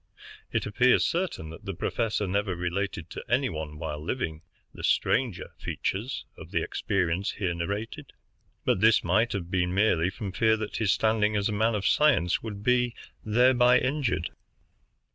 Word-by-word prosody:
It -, -, 0 dB
appears 125 Hz, +5 st, +3 dB
certain 170 Hz, -, -2 dB
that 80 Hz, -, -12 dB
the 95 Hz, -, -4 dB
professor 110 Hz, +2 st, -1 dB
never 100 Hz, 0 st, -1 dB
related 90 Hz, -1 st, -3 dB
to -, -, -6 dB
any 130 Hz, +2 st, +2 dB
one, 75 Hz, -1 st, -6 dB
while 75 Hz, -2 st, -5 dB
living, 80 Hz, -5 st, -3 dB, 0.3 s
the -, -, -10 dB
stranger 120 Hz, -8 st, +1 dB
features 110 Hz, +8 st, -3 dB
of -, -, -11 dB
the -, -, 0 dB
experience 95 Hz, 0 st, -1 dB
here 95 Hz, -5 st, -2 dB
narrated, 105 Hz, -, -4 dB, 0.5 s
but 95 Hz, -, +2 dB
this 110 Hz, 0 st, +5 dB
might 115 Hz, +2 st, +2 dB
have 90 Hz, -3 st, -4 dB
been 90 Hz, -1 st, 0 dB
merely 95 Hz, -4 st, +3 dB
from 95 Hz, +1 st, -6 dB
fear 110 Hz, +3 st, +3 dB
that 110 Hz, -1 st, -4 dB
his 105 Hz, -3 st, +2 dB
standing 110 Hz, +2 st, +2 dB
as 100 Hz, +1 st, +1 dB
a -, -, -2 dB
man 110 Hz, +2 st, +2 dB
of 100 Hz, -2 st, -2 dB
science 95 Hz, -, +3 dB
would 105 Hz, -3 st, -7 dB
be 125 Hz, 0 st, +2 dB, 0.3 s
thereby 125 Hz, +2 st, +5 dB
injured. 130 Hz, -, -1 dB
105 Hz, 160 wpm, -27 LUFS, 90-115 Hz, 0.5 s, this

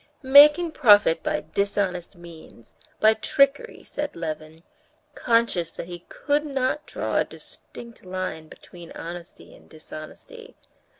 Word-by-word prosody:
"Making 295 Hz, +5 st, +7 dB
profit 205 Hz, -, +4 dB
by 305 Hz, 0 st, -3 dB
dishonest 200 Hz, -3 st, -2 dB
means, 170 Hz, -9 st, -15 dB, 0.3 s
by 220 Hz, 0 st, +5 dB
trickery," 275 Hz, +5 st, 0 dB
said 295 Hz, -1 st, -5 dB
Levin, 160 Hz, 0 st, -7 dB, 0.5 s
conscious 230 Hz, -8 st, 0 dB
that -, -, -7 dB
he 175 Hz, 0 st, -10 dB
could 290 Hz, 0 st, -1 dB
not 275 Hz, +1 st, -2 dB
draw -, -, -3 dB
a -, -, +3 dB
distinct 235 Hz, -1 st, -13 dB
line 185 Hz, -4 st, -5 dB
between 170 Hz, +1 st, -14 dB
honesty 170 Hz, +1 st, -10 dB
and -, -, -21 dB
dishonesty. 160 Hz, -, -12 dB
200 Hz, 120 wpm, -24 LUFS, 170-275 Hz, 0.5 s, Making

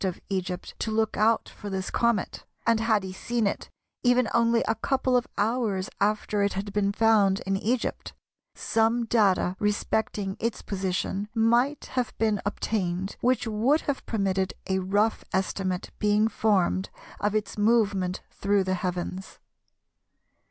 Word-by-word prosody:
of 185 Hz, -2 st, -2 dB
Egypt 185 Hz, -2 st, -3 dB
to -, -, -2 dB
look 220 Hz, 0 st, 0 dB
out 220 Hz, +2 st, +2 dB
for 205 Hz, -, -9 dB
this 190 Hz, -1 st, -3 dB
comet, 235 Hz, -5 st, 0 dB, 0.2 s
and 230 Hz, -1 st, +3 dB
had 220 Hz, -3 st, +2 dB
he 190 Hz, -1 st, -6 dB
seen 235 Hz, +3 st, -1 dB
it 200 Hz, -, -2 dB, 0.3 s
even 245 Hz, -1 st, +3 dB
only 230 Hz, 0 st, +3 dB
a 225 Hz, -, +3 dB
couple 260 Hz, +3 st, 0 dB
of 245 Hz, -1 st, +2 dB
hours 210 Hz, -3 st, 0 dB
after 210 Hz, 0 st, +1 dB
it 200 Hz, 0 st, +1 dB
had 195 Hz, +1 st, -4 dB
been 200 Hz, -1 st, +1 dB
found 205 Hz, -2 st, +3 dB
in 195 Hz, 0 st, -1 dB
Egypt, 230 Hz, +5 st, -2 dB, 0.4 s
some 230 Hz, +1 st, +1 dB
data 200 Hz, -5 st, +2 dB
respecting 205 Hz, -1 st, -1 dB
its 230 Hz, 0 st, -2 dB
position 190 Hz, +1 st, -2 dB
might 240 Hz, +6 st, +2 dB
have 250 Hz, -2 st, -2 dB
been 215 Hz, -3 st, +1 dB
obtained 190 Hz, -2 st, -2 dB
which 250 Hz, 0 st, +2 dB
would 230 Hz, +8 st, +2 dB
have 285 Hz, -2 st, -3 dB
permitted 190 Hz, -3 st, 0 dB
a 190 Hz, 0 st, +1 dB
rough 205 Hz, +4 st, +1 dB
estimate 185 Hz, -1 st, -1 dB
being 210 Hz, +1 st, +3 dB
formed 200 Hz, -4 st, +1 dB, 0.3 s
of 205 Hz, +1 st, 0 dB
its 210 Hz, -2 st, -1 dB
movement 205 Hz, -4 st, +1 dB
through 200 Hz, 0 st, +1 dB
the 185 Hz, 0 st, -1 dB
heavens. 180 Hz, +1 st, -4 dB
210 Hz, 145 wpm, -27 LUFS, 190-225 Hz, 0.4 s, and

